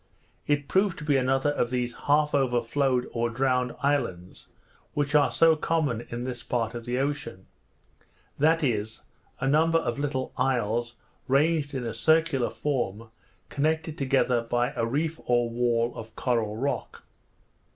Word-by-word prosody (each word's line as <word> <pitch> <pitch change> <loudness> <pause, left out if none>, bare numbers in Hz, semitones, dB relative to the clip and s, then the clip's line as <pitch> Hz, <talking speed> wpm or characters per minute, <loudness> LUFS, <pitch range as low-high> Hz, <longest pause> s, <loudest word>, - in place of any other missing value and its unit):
It 145 -1 +1
proved 190 -1 +2
to - - -7
be 150 -2 +2
another 135 +2 +2
of 120 -4 0
these 125 -1 -2
half 150 +1 +3
over 125 -4 +2
flowed 130 0 0
or 120 0 -1
drowned 125 0 0
islands, 115 -11 -2 0.5
which 145 0 -1
are 150 -1 +5
so 165 -1 +4
common 150 -7 -1
in 120 +1 -4
this 125 -1 -5
part 115 -2 -2
of 120 -1 -7
the 120 +1 -2
ocean; 135 -8 -3 0.9
that 160 +2 +3
is, 110 -4 -1 0.4
a 135 - -1
number 160 +4 +4
of 125 -5 -2
little 140 -2 -2
isles 120 -1 0 0.3
ranged 145 +1 +2
in 125 -2 -3
a 115 - -3
circular 160 +1 +2
form, 115 -6 -3 0.4
connected 160 +2 -1
together 130 -4 +1
by 120 +2 0
a 115 -2 0
reef 155 +6 -1
or 120 -1 +2
wall 120 0 +1
of 110 0 -9
coral 115 -4 -1
rock. 140 +4 -3
130 Hz, 150 wpm, -27 LUFS, 120-145 Hz, 0.9 s, are